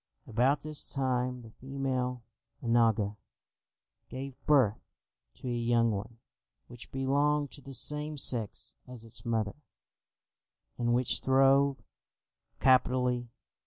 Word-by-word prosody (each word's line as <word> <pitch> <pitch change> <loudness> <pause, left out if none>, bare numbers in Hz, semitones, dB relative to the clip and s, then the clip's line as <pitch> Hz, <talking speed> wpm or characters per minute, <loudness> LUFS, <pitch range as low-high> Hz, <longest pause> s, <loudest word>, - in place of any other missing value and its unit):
About 125 +5 +1
this 155 -1 +4
time 125 -2 -1
the 110 - -13
female 130 -1 -3 0.4
onaga 115 -3 +2 0.9
gave 135 +1 -6
birth 130 -8 +4 0.5
to - - -9
a - - -1
young 115 -1 +2
one 110 +3 -5 0.5
which 120 -1 -13
belonged 145 +2 +1
to 140 - -9
the 135 0 -7
same 150 +4 -1
sex 115 -6 0
as 125 -3 -6
its 115 +1 -8
mother, 110 -2 -1 1.2
and 120 0 +2
which 125 0 0
throve 135 +1 +3 0.8
capitally. 125 -2 +2
125 Hz, 110 wpm, -30 LUFS, 115-135 Hz, 1.2 s, this